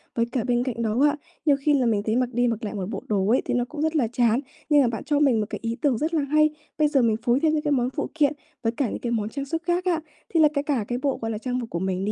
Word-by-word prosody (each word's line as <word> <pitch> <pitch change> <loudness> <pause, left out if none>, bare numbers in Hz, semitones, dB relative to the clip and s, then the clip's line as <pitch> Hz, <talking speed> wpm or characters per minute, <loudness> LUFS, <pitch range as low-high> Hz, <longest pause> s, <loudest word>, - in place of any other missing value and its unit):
Với 230 - +2
cả 245 -2 -1
bên 245 0 +1
cạnh 245 -3 -3
đó 225 +2 0
á, 295 0 +3 0.3
nhiều 290 -3 +5
khi 295 +1 +2
là 260 -3 +2
mình 210 -3 +1
thấy 220 - +1
mặc 250 0 +1
đi 245 +1 +2
mặc 230 0 -2
lại 210 - -4
một 195 -1 -4
bộ 200 -3 -5
đồ 195 -2 +1
ấy, 245 - +4
thì - - -1
nó 245 0 +1
cũng 295 +3 -7
rất 315 +1 0
là 265 -7 +2
chán. 235 0 +2 0.3
Nhưng 295 -2 +6
mà 255 - +3
bạn 225 -1 -3
cho 295 -1 +1
mình 270 -6 +4
một 210 - 0
cái - - -5
ý 230 0 -2
tưởng 270 -6 +2
rất 315 +5 -2
là 315 - +2
hay. 305 +2 +3 0.3
Bây 305 -1 +4
giờ 280 -2 +2
mình 225 -2 +3
phối 240 +2 +3
thêm 310 +1 +2
những 305 - +1
cái 295 - 0
món 250 -3 +2
phụ - - -3
kiện 300 -2 +2 0.3
với 225 - +2
cả 245 0 -1
những - - -4
cái 235 - -3
món 215 -2 -1
trang 275 +3 -4
sức 325 +4 -3
khác 350 +1 0
á, 335 -3 +1 0.3
thế 330 - +3
là 305 - +8
cái 280 -1 0
cả 270 -8 -1
cái 245 - -2
bộ, 275 -1 0
gọi 225 0 -2
là, 215 - -3
trang 250 +2 -2
phục 235 -2 -6
của 170 - -3
mình 190 +1 -1
đi, 210 - 0
250 Hz, 340 wpm, -24 LUFS, 225-295 Hz, 0.3 s, là